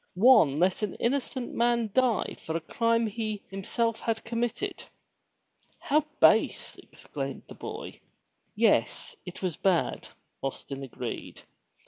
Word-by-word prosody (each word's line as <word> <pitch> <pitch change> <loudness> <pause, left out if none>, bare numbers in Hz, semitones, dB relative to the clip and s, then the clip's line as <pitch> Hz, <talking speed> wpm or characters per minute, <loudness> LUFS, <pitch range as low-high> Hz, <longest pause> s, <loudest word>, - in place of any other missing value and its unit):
One 210 - +6
let 180 +5 +2
an 210 -3 -2
innocent 255 0 -1
man 235 -2 +1
die 255 -4 +2
for 160 +1 -2
a - - -3
crime 230 +6 +1
he 215 -1 -3
himself 225 +4 -1
had 225 -1 -1
committed/' 235 +1 -2 0.9
"How 300 +2 +2 0.2
base!" - - +4
exclaimed - - -7
the - - -10
boy. - - -7 0.6
Yes, - - +2
it 180 - -8
was 180 -4 -1
bad.'* 185 -3 +1 0.3
Austin 135 0 -5
agreed. 135 -3 -6
225 Hz, 120 wpm, -28 LUFS, 185-235 Hz, 0.9 s, One